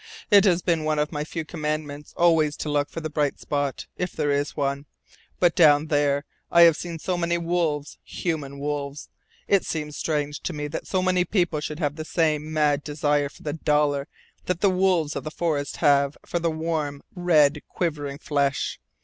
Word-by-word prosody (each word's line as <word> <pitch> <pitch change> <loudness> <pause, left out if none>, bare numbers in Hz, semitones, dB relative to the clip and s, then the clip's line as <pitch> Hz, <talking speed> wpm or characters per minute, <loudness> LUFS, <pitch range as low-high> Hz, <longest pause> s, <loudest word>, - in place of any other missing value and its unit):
"It 200 -1 +7
has 180 -3 +3
been 165 -3 +1
one 155 0 0
of 150 0 0
my 150 -2 -2
few 160 +1 -5
Commandments 150 -2 -4
always 160 -3 +3
to 150 - -4
look 145 0 +1
for 165 - -6
the 155 - -3
bright 145 -2 0
spot, 145 -2 -2
if 180 -1 -3
there 145 - 0
is 145 +1 -1
one. 140 0 -1 0.5
But, 175 -2 +4
down 150 -2 +5
there, 145 -1 +1 0.2
I 170 - +5
have 165 -2 +7
seen 170 0 -5
so 180 +3 -2
many 170 0 +1
wolves, 165 -4 -1
human 150 -5 -4
wolves. 145 0 -4 0.4
It 200 -2 +3
seems 150 -2 -4
strange 150 -2 -2
to 180 - -4
me 150 -1 -3
that 155 - -5
so 185 -1 0
many 185 -1 +3
people 175 -5 0
should 150 0 -5
have 150 -2 -2
the 155 - -4
same 155 -2 0
mad 150 -2 +2
desire 145 -1 0
for - - -17
the 150 - -3
dollar 150 -2 +1 0.4
that 180 -1 -1
the 200 - +4
wolves 180 -5 +1
of - - -3
the 155 - -4
forest 155 -3 -2
have 140 0 +4
for 175 - -2
warm, 160 -3 -2
red, 155 -5 +3
quivering 145 -5 -3
flesh. 140 -2 -1
150 Hz, 190 wpm, -25 LUFS, 145-170 Hz, 0.5 s, It